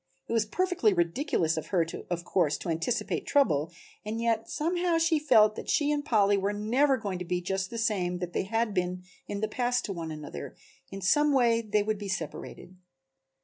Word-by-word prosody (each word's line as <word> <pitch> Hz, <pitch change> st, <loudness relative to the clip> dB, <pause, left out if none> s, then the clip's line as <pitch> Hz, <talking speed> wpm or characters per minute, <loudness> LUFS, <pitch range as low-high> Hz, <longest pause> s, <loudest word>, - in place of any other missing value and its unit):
It -, -, -3 dB
was 225 Hz, -2 st, +2 dB
perfectly 360 Hz, -, +1 dB
ridiculous 170 Hz, -, 0 dB
of 160 Hz, -, -4 dB
her 175 Hz, -4 st, +2 dB, 0.2 s
of 175 Hz, -1 st, -3 dB
course 165 Hz, -6 st, +1 dB
to -, -, -6 dB
anticipate 165 Hz, +9 st, -1 dB
trouble, 165 Hz, -, +2 dB, 0.3 s
and 215 Hz, +2 st, -4 dB
yet 230 Hz, -1 st, 0 dB
somehow 345 Hz, +2 st, 0 dB
she 330 Hz, -1 st, +2 dB
felt 215 Hz, -8 st, +5 dB
that -, -, -7 dB
she 295 Hz, 0 st, +2 dB
and 295 Hz, -1 st, 0 dB
Polly 205 Hz, -5 st, +3 dB
were 200 Hz, +1 st, 0 dB
never 255 Hz, +7 st, +2 dB
going 200 Hz, -6 st, -4 dB
to -, -, -3 dB
be 180 Hz, 0 st, -1 dB
just 190 Hz, +1 st, -2 dB
the 230 Hz, -, -6 dB
same 190 Hz, -6 st, 0 dB
that 175 Hz, -1 st, -5 dB
they -, -, +1 dB
had 225 Hz, +1 st, 0 dB
been 180 Hz, -1 st, -2 dB, 0.2 s
in 200 Hz, 0 st, -4 dB
the 215 Hz, -, +1 dB
past 245 Hz, +2 st, 0 dB
to 200 Hz, -, -3 dB
one 165 Hz, -2 st, -5 dB
another, 150 Hz, -, -7 dB, 0.3 s
in 195 Hz, 0 st, -7 dB
some 295 Hz, -, +3 dB
way 235 Hz, -3 st, +3 dB
they 210 Hz, -2 st, +1 dB
would 215 Hz, -1 st, -2 dB
be 205 Hz, -1 st, -6 dB
separated. 175 Hz, +1 st, -6 dB
210 Hz, 200 wpm, -28 LUFS, 180-245 Hz, 0.3 s, felt